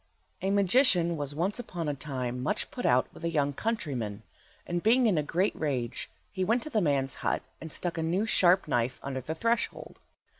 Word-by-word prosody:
A 190 - 0
MAGICIAN 195 -3 +4
was 145 -2 -4
once 185 +8 -1
upon 175 -9 -4
a 145 - 0
time 130 -3 -4
much 205 +11 -1
put 245 - -2
out 125 +1 +4
with - - -13
a 170 - 0
young 145 -3 +1
countryman, 130 - -3 0.4
and 175 0 -2
being 240 +5 +4
in 210 -5 +3
a 155 - +2
great 180 +7 0
rage 130 -7 -2 0.2
he 190 -2 -2
went 230 +6 +1
to 310 - -5
the 215 - +2
man's 135 -5 +1
hut - - 0 0.2
and 160 0 -7
stuck 175 +1 -1
a - - 0
new 175 +6 +1
sharp 185 -4 +4
knife 125 -2 0
under 135 -1 -3
the 155 +6 -4
threshold. 230 +6 -1
165 Hz, 200 wpm, -29 LUFS, 140-200 Hz, 0.4 s, MAGICIAN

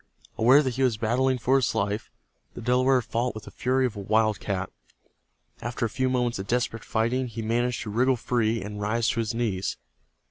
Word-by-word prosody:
Aware 130 +6 +6
that 130 -3 -2
he - - -1
was 125 -5 +2
battling 125 +4 +1
for 130 +3 +3
his 130 -4 0
life, 105 0 -1 0.5
the - - -7
Delaware 125 +1 +3
fought 120 +2 -2
with 110 - -7
the - - -11
fury 130 +1 +1
of 120 -3 -2
a - - -6
wildcat. 100 -2 0 0.9
After 120 0 -2
a - - -1
few 130 +2 0
moments 125 -4 0
of 95 - -5
desperate 120 -2 -1
fighting 120 +3 0
he 115 -1 -6
managed 120 +2 0
to 105 - -6
wriggle 125 +4 +3
free, 115 -3 0
and 105 +1 -6
rise 115 +3 +1
to 120 - -1
his 115 0 -1
knees. 105 -6 -1
115 Hz, 200 wpm, -26 LUFS, 110-125 Hz, 0.9 s, Aware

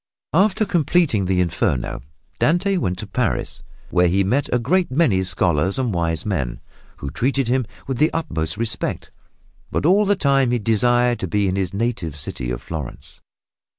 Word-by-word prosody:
After 200 +5 +3
completing 165 - +2
the 90 0 +1
Inferno 75 -6 -1 0.4
Dante 190 +5 +2
went 90 - -1
to 105 - -5
Paris, 115 +4 -2 0.3
where 90 0 +4
he 95 +3 +2
met 130 +9 0
a 125 - +3
great 175 +9 +1
many 130 - +2
scholars 90 0 +1
and 125 -5 -1
wise 80 -2 0
men, 65 - -2 0.4
who 70 - -6
treated 130 - 0
him 125 -1 +1 0.2
with 135 -3 -3
the 155 +2 +4
utmost 80 - -2
respect, 110 -2 -2 0.6
but - - -1
all 200 +5 +4
the 205 - +4
time 140 -6 +2
he 120 - +2
desired 120 +2 +2
to 95 - -3
be 100 +4 +1
in 95 - 0
his 95 -3 -1
native 100 -8 -2
city 75 -4 -5
of - - -4
Florence. 65 - -7
110 Hz, 170 wpm, -21 LUFS, 90-140 Hz, 0.6 s, where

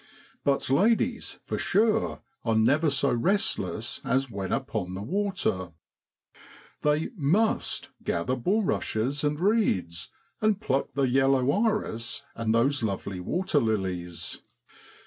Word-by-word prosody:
But 140 -1 +1
ladies, 215 +11 +2
for - - -3
sure, 215 +1 +1 0.2
are 115 -1 +1
never 145 +8 +3
so 140 0 +2
restless 120 - 0
as 135 -1 0
when 95 -2 -4
upon 110 -9 -2
the 100 - -5
water! 180 - -1 1.1
They 150 +1 +1
must 190 +8 +1
gather 85 +10 0
bulrushes 145 - 0
and 150 0 0
reeds, 165 - +1 0.3
and 215 -2 +2
pluck 140 -11 -1
the 140 - +1
yellow 135 +1 +3
iris 200 - -1
and 115 -1 -1
those 130 +5 +2
lovely 100 -3 -3
waterlilies 95 - -1
135 Hz, 110 wpm, -27 LUFS, 110-180 Hz, 1.1 s, never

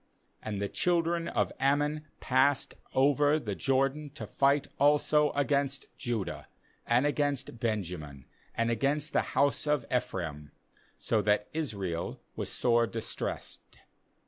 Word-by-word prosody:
9And 105 -2 -3
the 100 - -1
children 170 - +1
of - - 0
Ammon 145 +3 +1
passed 145 -1 +2 0.2
over 145 +2 +4
the 110 -9 -3
Jordan 135 +6 +1
to - - -5
fight 140 +1 +2
also 150 +1 +4
against 140 -1 -1
Judah, 120 -7 -3 0.4
and 120 +4 +3
against 145 -4 -1
Benjamin, 90 - -3 0.3
and 115 0 +1
against 145 +6 0
the - - +4 0.2
house 140 +2 +2
of 150 -3 +1
Ephraim, 80 -11 -3 0.4
so 110 - +1
that 105 +1 +1
Israel 100 - -3 0.2
was - - -4
sore 120 -1 +3
distressed. 115 0 -4
135 Hz, 120 wpm, -30 LUFS, 110-145 Hz, 0.4 s, over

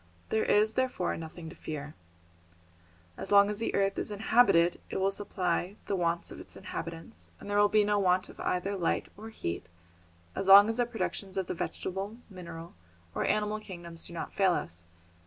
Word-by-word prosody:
There 220 - +2
is, 215 +1 +3
therefore, 255 -7 0
nothing 160 +1 -8
to - - -12
fear. 150 -1 -6 1.2
As - - -5
long 200 0 +7
as 210 - -4
the 230 - -1
earth 195 0 +1
is - - -2
inhabited 205 -5 +4
it - - -3
will 190 +1 +2
supply 185 -1 -1
the 200 - -1
wants 170 -1 0
of - - -9
its - - -9
inhabitants, 170 +1 -7
and - - -10
there 205 0 +2
will 205 0 +5
be 215 0 +4
no 205 0 +2
want 185 -1 +2
of - - -14
either 195 +3 -1
light 175 -3 0
or 220 +2 -9
heat 85 - -4 0.7
as 190 - -3
long 200 +2 +10
as 225 - -1
the 245 -1 +2
productions 200 -5 -4
of 190 - 0
the - - -3
vegetable, 195 +4 -4
mineral 170 -2 -9 0.4
or - - -1
animal 210 0 +1
kingdoms 170 -5 -8
do - - -11
not 170 - -5
fail 190 -2 +3
us. 85 - -4
195 Hz, 190 wpm, -30 LUFS, 170-210 Hz, 1.2 s, long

